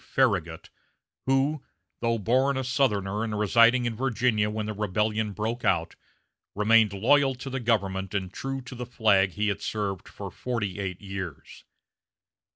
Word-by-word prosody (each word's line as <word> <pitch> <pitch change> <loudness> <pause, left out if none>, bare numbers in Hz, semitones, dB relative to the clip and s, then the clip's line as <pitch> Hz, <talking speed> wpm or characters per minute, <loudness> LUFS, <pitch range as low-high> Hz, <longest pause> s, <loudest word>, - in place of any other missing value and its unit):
Farragut, 95 -11 0 0.6
who, 135 +2 +1 0.4
though 115 0 +1
a - - -2
born 130 +5 +1
Southerner 105 -6 0
and 110 -2 -3
residing 115 +4 +4
in 115 -1 -2
Virginia 115 -3 +1
when 105 0 -3
the 110 - -3
rebellion 105 +1 -1
broke 110 +4 -3
out, 85 -3 +1 0.6
remained 110 0 +4
loyal 135 +7 +3
to 135 +2 -7
the 135 - -2
government 95 -5 -1
and 95 -1 -2
true 135 +3 -4
to 125 +1 -10
the 125 -1 -6
flag 100 -6 +3
he 105 0 0
had 100 - -3
served 100 -3 -3
for 100 -2 -8
forty 105 -2 -3
eight 95 -2 -4
years. 95 -5 -7
110 Hz, 155 wpm, -27 LUFS, 100-125 Hz, 0.6 s, residing